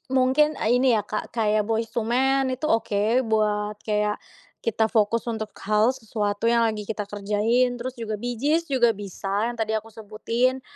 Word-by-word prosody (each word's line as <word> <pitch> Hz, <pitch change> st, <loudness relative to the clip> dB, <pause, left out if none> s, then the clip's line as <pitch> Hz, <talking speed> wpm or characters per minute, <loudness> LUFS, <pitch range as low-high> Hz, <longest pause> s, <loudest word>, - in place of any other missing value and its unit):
Mungkin, 270 Hz, +4 st, +3 dB
ah, 220 Hz, -, +1 dB
ini 250 Hz, 0 st, +4 dB
ya, 215 Hz, -, +2 dB
Kak, 210 Hz, +2 st, -5 dB
kayak 215 Hz, -2 st, +1 dB
Boyz 225 Hz, 0 st, -1 dB
II 220 Hz, -, 0 dB
Men 265 Hz, +2 st, +2 dB
itu 305 Hz, +5 st, -3 dB
oke 225 Hz, +2 st, +1 dB
buat 210 Hz, -1 st, 0 dB
kayak, 210 Hz, -1 st, -1 dB, 0.4 s
kita 225 Hz, 0 st, +1 dB
fokus 225 Hz, 0 st, +2 dB
untuk 220 Hz, -1 st, -3 dB, 0.2 s
hal 215 Hz, +3 st, +3 dB
sesuatu 210 Hz, -2 st, -2 dB
yang 235 Hz, 0 st, +3 dB
lagi 215 Hz, -2 st, 0 dB
kita 210 Hz, -1 st, -4 dB
kerjain. 210 Hz, +5 st, +1 dB
Terus 245 Hz, +1 st, -6 dB
juga, 220 Hz, -2 st, -4 dB
Bee 240 Hz, +3 st, -4 dB
Gees 305 Hz, +6 st, +1 dB
juga 240 Hz, -4 st, +3 dB
bisa 200 Hz, +2 st, -3 dB
yang 240 Hz, -, -7 dB
tadi 220 Hz, -1 st, -1 dB
aku 220 Hz, 0 st, -3 dB
sebutin. 230 Hz, +4 st, -1 dB
225 Hz, 180 wpm, -24 LUFS, 210-245 Hz, 0.4 s, ini